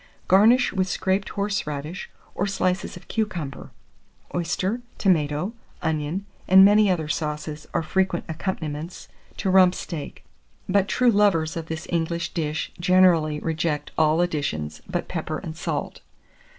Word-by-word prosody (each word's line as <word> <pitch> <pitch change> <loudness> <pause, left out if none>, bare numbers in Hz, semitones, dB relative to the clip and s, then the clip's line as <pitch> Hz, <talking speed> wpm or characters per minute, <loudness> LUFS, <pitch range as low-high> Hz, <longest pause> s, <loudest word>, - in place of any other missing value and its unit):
Garnish 225 +7 +5
with 190 -2 +1
scraped 190 +1 0
horseradish, 180 -6 -3 0.2
or 200 - -1
slices 185 -2 -1
of - - -15
cucumber. 175 -11 -3 0.6
Oyster, 185 +7 -1 0.2
tomato, 160 +1 +1 0.3
onion, 160 +5 -1 0.2
and 190 +1 +8
many 205 0 +5
other 165 -4 0
sauces, 150 0 -3
are - - 0
frequent 185 +2 0
accompaniments 160 -1 -5 0.3
to 190 - 0
rump 185 -1 +6
steak, 160 -5 -7 0.4
but 195 0 +2
true 250 +3 +3
lovers 200 -7 +2
of 165 -1 -5
this 160 0 -5
English 170 0 -1
dish 155 -2 -2
generally 175 -4 +4
reject 160 -2 -2
all 160 +1 +3
additions 80 - -2
but 175 -2 -2
pepper 155 -2 -3
and 160 -3 -7
salt. - - -4
175 Hz, 130 wpm, -24 LUFS, 155-190 Hz, 0.6 s, and